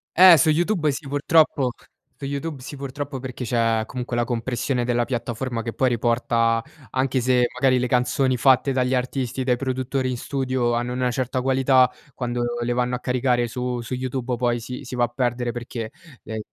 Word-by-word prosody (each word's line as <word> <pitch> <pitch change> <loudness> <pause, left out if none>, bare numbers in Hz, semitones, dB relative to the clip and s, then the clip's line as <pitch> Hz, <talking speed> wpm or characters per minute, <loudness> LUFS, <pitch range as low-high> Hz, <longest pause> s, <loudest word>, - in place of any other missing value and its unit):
Eh, 180 -2 +9
su 155 - +4
YouTube 165 -1 +2
sì, 140 +1 -6
purtroppo 145 -2 +3 0.5
su 140 - -7
YouTube 140 +1 -4
sì, 135 - -8
purtroppo, 140 0 -5
perché 125 -1 -6
c'è 115 -1 +1
comunque 125 -1 -5
la 120 - +1
compressione 120 +2 -1
della 120 0 +1
piattaforma 120 0 -3
che 115 0 -5
poi 130 - +2
riporta, 115 -1 +1 0.3
anche 130 -1 0
se 125 0 +3
magari 130 -1 +3
le 125 - 0
canzoni 125 +1 +2
fatte 135 +2 +4
dagli 130 0 +1
artisti, 130 0 -1
dai 125 - +3
produttori 130 0 -2
in 125 - -2
studio 130 -2 -1
hanno 120 +1 -1
una 125 0 0
certa 130 0 -1
qualità, 130 0 +4 0.2
quando 120 -1 -2 0.2
le 120 +1 0
vanno 125 0 0
a - - -4
caricare 125 -1 +1
su 125 +1 -3
su 120 - -6
YouTube 130 -1 -2
poi 120 0 0
si 125 +3 -7
si 125 -1 -7
va 120 - +3
a - - -4
perdere 120 0 -1
perché, 120 -2 -5 0.3
ehm, 110 0 -5
125 Hz, 185 wpm, -23 LUFS, 120-135 Hz, 0.5 s, Eh